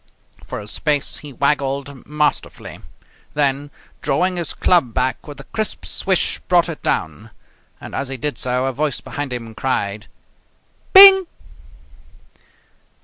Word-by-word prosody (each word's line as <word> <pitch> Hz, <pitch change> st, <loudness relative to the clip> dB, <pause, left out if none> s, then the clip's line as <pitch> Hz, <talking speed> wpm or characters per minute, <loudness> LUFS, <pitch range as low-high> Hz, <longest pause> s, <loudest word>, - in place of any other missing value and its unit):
For -, -, -6 dB
a 105 Hz, -, -9 dB
space 145 Hz, +6 st, -1 dB
he 145 Hz, -, -10 dB
waggled 140 Hz, 0 st, -2 dB
masterfully, 150 Hz, +1 st, -2 dB, 0.6 s
then, 145 Hz, 0 st, 0 dB, 0.3 s
drawing 180 Hz, +6 st, 0 dB
his 170 Hz, -2 st, -3 dB
club 165 Hz, -11 st, +2 dB
back 130 Hz, +3 st, -1 dB
with 145 Hz, -2 st, -10 dB
a -, -, -9 dB
crisp 215 Hz, +7 st, -4 dB
swish, 190 Hz, -3 st, 0 dB
brought 175 Hz, -1 st, +3 dB
it 160 Hz, -, -7 dB
down. 95 Hz, +8 st, -3 dB, 0.5 s
And, -, -, -10 dB
as 135 Hz, -, -3 dB
he 135 Hz, 0 st, -5 dB
did 145 Hz, +4 st, -4 dB
so, 125 Hz, +1 st, 0 dB
a 135 Hz, -, -2 dB
voice 150 Hz, +2 st, -2 dB
behind 145 Hz, -2 st, -6 dB
him 115 Hz, -2 st, -6 dB
cried: 105 Hz, -4 st, -3 dB, 0.8 s
"Bing!" 385 Hz, -1 st, +9 dB
140 Hz, 135 wpm, -19 LUFS, 130-155 Hz, 0.8 s, Bing